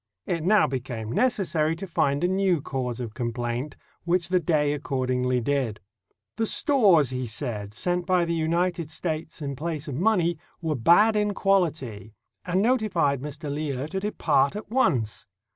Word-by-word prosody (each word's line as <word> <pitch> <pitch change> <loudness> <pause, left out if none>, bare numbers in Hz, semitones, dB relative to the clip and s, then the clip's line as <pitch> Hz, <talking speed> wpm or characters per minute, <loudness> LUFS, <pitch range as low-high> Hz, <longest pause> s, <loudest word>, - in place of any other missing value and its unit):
It 170 -3 -2
now 210 +4 +5
became 120 -4 -4
necessary 170 - +1
to 185 +4 -6
find 145 -4 0
a - - +4
new 190 -2 +2
cause 130 -3 -4
of 115 -4 -5
complaint, 120 +3 -3 0.3
which 175 0 0
the 185 0 +3
Dey 150 -3 +1
accord 135 -3 -2
ingly 125 -1 +1
did. 130 -6 -1 0.6
The 225 - +1
stores, 200 - +4
he 125 -1 -3
said, 110 -3 -4
sent 175 +4 -1
by 180 -2 +3
the 170 - -1
United 170 0 0
States 160 -1 -4
in 140 -1 -3
place 155 +1 -4
of 145 - -4
money 175 - +1 0.2
were 160 -3 -1
bad 175 - +5
in 210 -1 +1
quality, 145 - 0 0.3
and 185 +2 0
notified 195 - +1
Mr. 145 0 -5
Lear 145 -2 -3
to 190 - -2
depart 165 -8 +1
at 210 0 -7
once. 135 - +1
155 Hz, 160 wpm, -25 LUFS, 130-185 Hz, 0.6 s, now